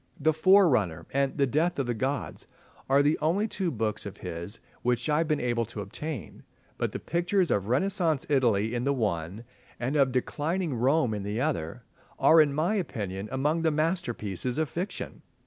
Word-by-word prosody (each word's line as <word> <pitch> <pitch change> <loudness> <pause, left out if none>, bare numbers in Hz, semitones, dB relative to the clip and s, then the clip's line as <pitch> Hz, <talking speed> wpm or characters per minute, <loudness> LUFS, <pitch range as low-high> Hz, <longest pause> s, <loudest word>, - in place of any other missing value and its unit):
"The 155 +2 +3
Forerunner" 145 - +4
and 140 +1 0
"The 140 - +4
Death 155 +7 0
of 140 - 0
the 120 - -1
Gods" 130 +4 -3 0.4
are 140 +1 +5
the 150 +2 +2
only 185 +8 +1
two 190 -4 -2
books 110 -6 -2
of - - -9
his 85 +7 -6 0.2
which 125 +1 0
I 150 0 +2
have 165 - +1
been 155 -2 +1
able 120 -1 0
to 110 -2 -7
obtain, 120 - -6 0.4
but - - 0
the - - -4
pictures 175 +2 0
of 100 -1 0
Renaissance 160 - +1
Italy 115 -6 +2
in 120 0 -1
the 140 +1 +1
one, 100 -3 -2 0.4
and 130 +4 -2
of 135 -3 +4
declining 155 +6 -1
Rome 125 0 +2
in 105 - -3
the 105 +3 -3
other, 125 - -2 0.3
are 160 0 +6
in 150 -2 +3
my 155 +8 0
opinion 105 - -3
among 150 +5 0
the 165 - +3
masterpieces 140 - -1
of 155 -2 0
fiction. 180 +4 -5
135 Hz, 180 wpm, -28 LUFS, 115-160 Hz, 0.4 s, are